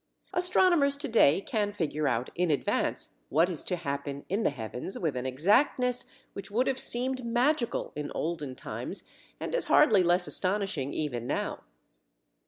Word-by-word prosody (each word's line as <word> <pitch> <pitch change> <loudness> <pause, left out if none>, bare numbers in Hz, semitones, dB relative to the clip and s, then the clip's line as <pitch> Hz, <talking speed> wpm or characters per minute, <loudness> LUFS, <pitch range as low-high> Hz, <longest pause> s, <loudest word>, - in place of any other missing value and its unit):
Astronomers 355 -5 +3
to 285 - -3
day 195 - +4
can 205 -1 -2
figure 155 -5 -1
out 120 -1 -1
in 175 0 0
advance 145 - -1
what 165 +6 +3
is 165 - 0
to 180 - 0
happen 140 -3 -5
in 200 +5 0
the - - +2
heavens 125 - -5
with 160 -6 -2
an 125 +1 -3
exactness 245 - +3 0.3
which 195 0 -7
would 235 +5 +1
have 265 -1 0
seemed 255 +1 -1
magical 240 +2 0
in 150 -1 -4
olden 150 -5 -3
times, - - -4 0.3
and - - -5
is - - +1
hardly 220 -10 +5
less 175 +1 +2
astonishing 185 -9 0
even 125 -7 -3
now. - - -2
185 Hz, 160 wpm, -29 LUFS, 145-245 Hz, 0.3 s, hardly